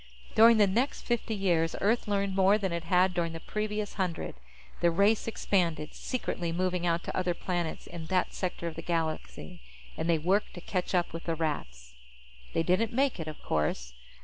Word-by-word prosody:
During 230 0 +7
the 210 - +6
next 235 +9 0
fifty 235 -2 -1
years, 170 -5 +1
Earth 225 +3 +1
learned 200 -1 0
more 195 +2 +5
than 195 -4 -2
it 170 -1 -3
had 180 +2 +3
during 170 -2 -1
the 165 - -5
previous 210 +2 -3
hundred. 180 -3 -2 0.5
The 170 - +4
race 200 +7 +3
expanded, 170 -8 0
secretly, 175 -9 -3
moving 180 0 0
out 170 +1 +1
to - - -5
other 180 -2 0
planets 175 -3 -3
in 165 -2 -8
that 185 0 +1
sector 180 -2 -3
of 165 - -5
the 165 - -5
galaxy. 160 - -3 0.3
And 165 - -2
they 165 - +4
worked 185 +7 +1
to 175 - -8
catch 185 +1 -2
up 175 -2 +1
with 165 - -6
the 165 - 0
Rats. 65 - -4 0.6
They 165 - +2
didn't 185 +6 +2
make 265 -3 +1
it, 160 - -4
of 155 - -8
course. 65 -5 -1
180 Hz, 190 wpm, -29 LUFS, 165-200 Hz, 0.6 s, During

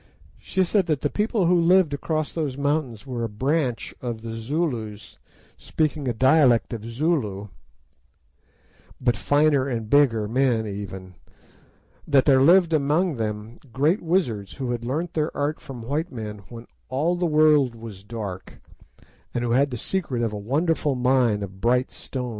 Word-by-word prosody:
She 190 - 0
said 185 0 +1
that 155 -4 0
the 145 - -1
people 210 -2 0
who 175 - +4
lived 175 -2 +4
across 155 +1 -2
those 150 -5 -3
mountains 140 -5 -1
were 125 -3 -4
a 115 - -2
"branch" 130 +3 -1
of 115 -3 -5
the 115 -1 -5
Zulus, 115 -4 -4 0.4
speaking 155 -3 -2
a - - +2
dialect 130 -1 +4
of 110 -2 -5
Zulu, 115 - -1 1.5
but 120 -2 +1
finer 145 +5 +2
and 115 -4 -4
bigger 120 -7 +4
men 120 -1 +1
even; 95 -2 -7 0.9
that 140 -3 +4
there 135 -2 +5
lived 170 +3 +5
among 155 +2 +1
them 110 +1 -4
great 150 - +1
wizards, 125 - -1
who 130 -3 -4
had 120 -1 -3
learnt 155 +8 -3
their 155 -1 -2
art 145 +2 -1
from 135 -7 -9
white 150 +8 -2
men 105 -4 -6
when 115 0 -10 0.2
"all 155 +7 0
the 175 0 0
world 150 -5 +4
was 110 -4 -10
dark," 100 -4 -7 0.8
and 120 - 0
who 120 - -1
had 140 +4 +3
the 125 - -5
secret 135 - -2
of 115 -2 -1
a - - -4
wonderful 145 +7 0
mine 125 -4 +2
of 95 -1 -9
"bright 125 +2 +2
stones." 125 -2 -5
130 Hz, 160 wpm, -24 LUFS, 115-155 Hz, 1.5 s, there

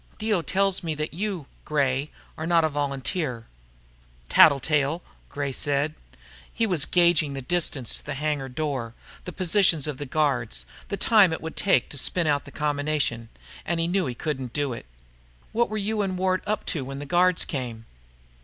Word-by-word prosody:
"Dio 215 -4 +1
tells 195 +2 +1
me 160 -3 -3
that 150 0 -3
you, 185 -3 -3 0.2
Gray, 140 -1 0 0.3
are 160 - -4
not 170 -1 +4
a 160 - +2
volunteer." 140 -2 -2 0.8
"Tattletale," 145 +3 +4 0.5
said 145 +3 0
Gray. - - -28 0.4
He 230 - 0
was 180 -9 +2
gauging 170 -5 +3
the 135 - -5
distance 140 -5 0
to - - -4
the 145 - -3
hangar 145 -2 -2
door, 130 -4 -3 0.3
the 180 - -5
positions 180 -4 +3
of 150 -3 -3
the 145 - -5
guards, 125 - 0 0.2
the 200 - -3
time 205 -3 +5
it 160 - -2
would 160 - -6
take 190 -11 +2
to 145 - -2
spin 175 +6 +3
out 145 -2 +1
the - - -11
combination. 145 -6 -1 0.3
And 170 0 -1
he 165 - +1
knew 180 -2 +1
he 125 - -4
couldn't 130 -3 -4
do 145 -3 -1
it. 115 - -9 0.6
"What 235 +1 +1
were 215 - -3
you 210 +1 -1
and 190 -2 -1
Ward 185 0 +1
up 215 +1 -1
to 150 - -3
when 135 +1 -6
the 145 - -6
guards 180 +2 +3
came?" 120 -5 -5
150 Hz, 180 wpm, -25 LUFS, 135-180 Hz, 0.8 s, time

